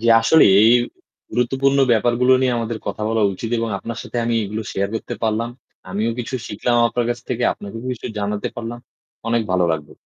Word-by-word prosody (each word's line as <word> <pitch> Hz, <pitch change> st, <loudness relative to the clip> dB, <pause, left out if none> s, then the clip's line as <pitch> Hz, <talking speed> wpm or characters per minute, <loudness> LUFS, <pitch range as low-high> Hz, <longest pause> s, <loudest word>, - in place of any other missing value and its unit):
জি, 115 Hz, -, -2 dB
আসলে 155 Hz, +8 st, +6 dB, 0.2 s
এই 110 Hz, +2 st, +6 dB, 0.6 s
গুরুত্বপূর্ণ 135 Hz, +3 st, +1 dB
ব্যাপারগুলো 120 Hz, +3 st, +3 dB
নিয়ে 130 Hz, -1 st, +2 dB
আমাদের 115 Hz, -1 st, -3 dB
কথা -, -, -4 dB
বলা 115 Hz, 0 st, +1 dB
উচিত 115 Hz, +4 st, -5 dB
এবং 115 Hz, 0 st, -1 dB
আপনার 115 Hz, +3 st, -6 dB
সাথে -, -, -8 dB
আমি 115 Hz, 0 st, 0 dB
এগুলো 105 Hz, +2 st, -4 dB
শেয়ার 100 Hz, 0 st, -1 dB
করতে 115 Hz, -, -4 dB
পারলাম। 115 Hz, +1 st, 0 dB, 0.4 s
আমিও 105 Hz, +4 st, 0 dB
কিছু 125 Hz, +2 st, -4 dB
শিখলাম 120 Hz, +4 st, 0 dB
আপনার 120 Hz, +1 st, -1 dB
কাছ 120 Hz, -, -2 dB
থেকে, 125 Hz, -1 st, -2 dB
আপনাকেও 105 Hz, +3 st, -9 dB
কিছু 120 Hz, -, -7 dB
জানাতে 105 Hz, 0 st, -2 dB
পারলাম। 120 Hz, 0 st, -5 dB, 0.5 s
অনেক 115 Hz, -1 st, +2 dB
ভালো 90 Hz, -1 st, +2 dB
লাগলো। 75 Hz, -1 st, -5 dB
115 Hz, 185 wpm, -20 LUFS, 105-120 Hz, 0.6 s, আসলে